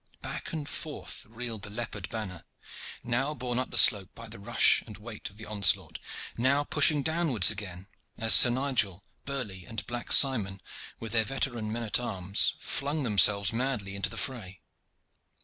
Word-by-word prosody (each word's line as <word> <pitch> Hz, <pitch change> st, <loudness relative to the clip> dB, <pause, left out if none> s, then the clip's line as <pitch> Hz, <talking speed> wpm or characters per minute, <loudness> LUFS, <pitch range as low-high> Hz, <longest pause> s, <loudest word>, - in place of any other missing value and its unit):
Back -, -, -7 dB
and 155 Hz, -3 st, -6 dB
forward 155 Hz, -1 st, -7 dB, 0.2 s
reeled 115 Hz, -1 st, -7 dB
the 105 Hz, -, -6 dB
leopard 105 Hz, -3 st, -7 dB
banner, 100 Hz, -7 st, -7 dB, 0.6 s
now 135 Hz, +5 st, -2 dB
borne 125 Hz, -1 st, -4 dB
up 130 Hz, -, -5 dB
the -, -, -1 dB
slope 100 Hz, -4 st, +5 dB
by 115 Hz, 0 st, -10 dB
the 110 Hz, 0 st, -11 dB
rush 115 Hz, +3 st, +3 dB
and 105 Hz, -3 st, -11 dB
weight 110 Hz, 0 st, -9 dB
of 100 Hz, -, -21 dB
the 110 Hz, -, -10 dB
onslaught, 100 Hz, -4 st, 0 dB, 0.4 s
now 135 Hz, +4 st, 0 dB
pushing 145 Hz, 0 st, +4 dB
downwards 160 Hz, -, +3 dB
again 95 Hz, -3 st, -8 dB, 0.3 s
as 115 Hz, 0 st, +5 dB
Sir 125 Hz, -, +9 dB
Nigel, 120 Hz, -8 st, -2 dB, 0.2 s
Burley, 115 Hz, -10 st, -6 dB
and 115 Hz, -, -7 dB
Black 120 Hz, 0 st, -7 dB
Simon 105 Hz, -9 st, +4 dB, 0.4 s
with 115 Hz, -1 st, -6 dB
their 110 Hz, -1 st, +1 dB
veteran 120 Hz, -4 st, -4 dB
men 115 Hz, +1 st, -5 dB
at 110 Hz, -, -1 dB
arms, 100 Hz, -5 st, +1 dB
flung 145 Hz, +2 st, -3 dB
themselves 100 Hz, -3 st, +4 dB
madly 115 Hz, -5 st, -4 dB
into 100 Hz, 0 st, -3 dB
the -, -, -10 dB
fray. 110 Hz, -10 st, -6 dB
115 Hz, 165 wpm, -27 LUFS, 100-130 Hz, 0.6 s, Sir